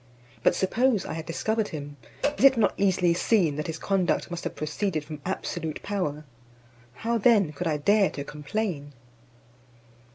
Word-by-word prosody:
But - - +3
suppose 225 +2 +1
I - - -4
had 160 0 -6
discovered 220 +6 -1
him, 145 -2 -7 0.4
is - - -2
it 270 -2 +7
not 225 - +3
easily 185 -3 +2
seen 175 -4 +2
that 150 - -3
his 160 -1 -4
conduct 185 -1 0
must 175 -1 -4
have - - -3
proceeded 155 +1 -2
from 150 -1 -8
absolute 165 -4 -4
power? 155 -7 -2 0.7
How 230 - -1
then 205 -8 +4
could 175 +4 -3
I 155 -2 +1
dare 200 +6 +3
to 140 - -6
complain? 150 -1 -4
175 Hz, 160 wpm, -26 LUFS, 150-205 Hz, 0.7 s, it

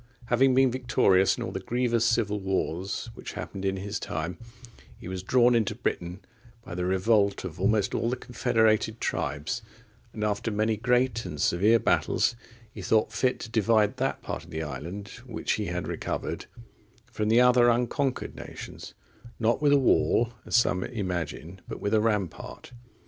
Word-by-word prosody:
Having 130 +1 +4
been 130 -1 +4
victorious 110 -7 +3
in - - -3
all - - -4
the - - -4
grievous 120 -2 0
civil 115 -3 +1
wars 95 -1 -2
which - - -8
happened 95 - -6
in 95 0 0
his 100 +3 -4
time, 80 +3 -4 0.6
he - - -10
was 95 0 -4
drawn 120 +5 +4
into 110 -3 +1
Britain 90 -5 -3 0.4
by - - -8
the 90 0 -2
revolt 100 +2 +2
of 85 -2 -7
almost 100 +1 +2
all 115 - 0
the 125 - 0
confederated 110 -3 +1
tribes; 75 - -2 0.5
and, 105 - -5
after 105 +1 -1
many 110 +1 +1
great 120 +1 +1
and 75 - -7
severe 100 +9 +4
battles, 115 - +1 0.4
he 105 - -9
thought 110 +4 +1
fit 130 -1 +1
to - - -6
divide 110 +1 +2
that 135 +1 -2
part - - -5
of - - -16
the 80 0 -4
island, 85 +8 -6 0.2
which - - -3
he - - -1
had - - -3
recovered, - - -4 0.6
from 105 0 -1
the 115 +2 +5
other 125 -1 +6
unconquered 125 +3 0
nations, - - -9 0.4
not 115 +3 +1
with 145 -1 +4
a 145 - +6
wall, 120 -3 +2
as - - 0
some 95 -6 +3
imagine, 90 -4 -4
but - - -6
with 100 - -2
a 110 - +4
rampart. 105 -5 -2
110 Hz, 170 wpm, -27 LUFS, 95-120 Hz, 0.6 s, other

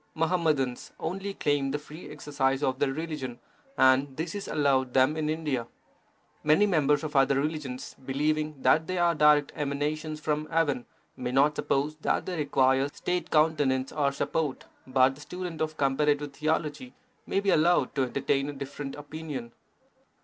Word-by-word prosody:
Muhammadans 155 -6 0
only 195 +3 -4
claim 145 -2 0
the 145 - -1
free 150 +3 -11
exercise 145 -2 -1
of 130 0 0
their 135 - +2
religion, 150 -5 -5 0.4
and 130 +1 +4
this 160 +1 -3
is 205 -1 -5
allowed 135 -3 +1
them 130 +3 +4
in 155 -1 -1
India. 150 -7 -2 0.8
Many 155 +7 +5
members 150 -6 +2
of 155 -1 -5
other 135 0 +4
religions, 145 -4 -4
believing 150 +2 -1
that 155 +5 +4
they 185 - -2
are 175 -1 +3
direct 150 -2 +4
emanations 150 +2 -2
from 150 0 -2
heaven, 145 -7 0 0.3
may 125 -1 -4
not 140 +3 +3
suppose 145 +3 -1
that 155 - 0
they 185 - -3
require 135 -2 +2
State 180 +1 -3
countenance 145 -4 +2
or 145 -2 +1
support, 145 0 -2 0.2
but 130 0 +4
the 145 - -14
student 180 0 -6
of 155 0 -2
comparative 145 +1 +1
theology 155 - -2 0.3
must 195 - 0
be 200 - +3
allowed 160 -3 +3
to 140 - 0
entertain 140 +2 0
a - - -5
different 140 0 -6
opinion. 145 -5 -7
150 Hz, 155 wpm, -28 LUFS, 135-155 Hz, 0.8 s, Many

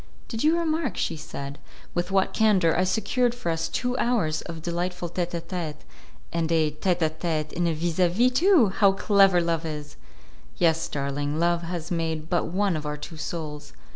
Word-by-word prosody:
"Did 225 -2 -3
you 320 +2 +4
remark," 315 - -1
she 165 - -1
said, 140 -2 -7 0.3
"with 175 +1 -1
what 195 -1 +2
candour 195 -7 +3
I 185 - +2
secured 235 +5 +1
for 175 -8 -2
us 165 0 -1
two 250 0 -2
hours 170 -11 +1
of 165 -2 -8
delightful 175 +1 -2
'tete 175 0 -3
a 170 - -2
tete', 170 -3 -5 0.5
and 165 -1 0
a 160 -2 +3
'tete 175 +3 0
a 160 - +3
tete' 155 -2 -2
in 175 0 0
a 165 - +1
'vis 165 +2 -2
a 180 -1 +5
vis', 240 +8 +3
too! 310 - +5
How 195 +1 +4
clever 195 -2 +4
Love 170 -1 0
is!" 150 -2 -6 0.6
"Yes, 165 -1 +2
darling, 145 +1 -2
Love 170 0 +2
has 170 0 -5
made 160 -2 -2
but 175 - +2
one 190 +1 +1
of 150 -1 -4
our 150 0 -3
two 160 +2 -9
souls. 150 -2 -6
170 Hz, 195 wpm, -26 LUFS, 160-195 Hz, 0.6 s, a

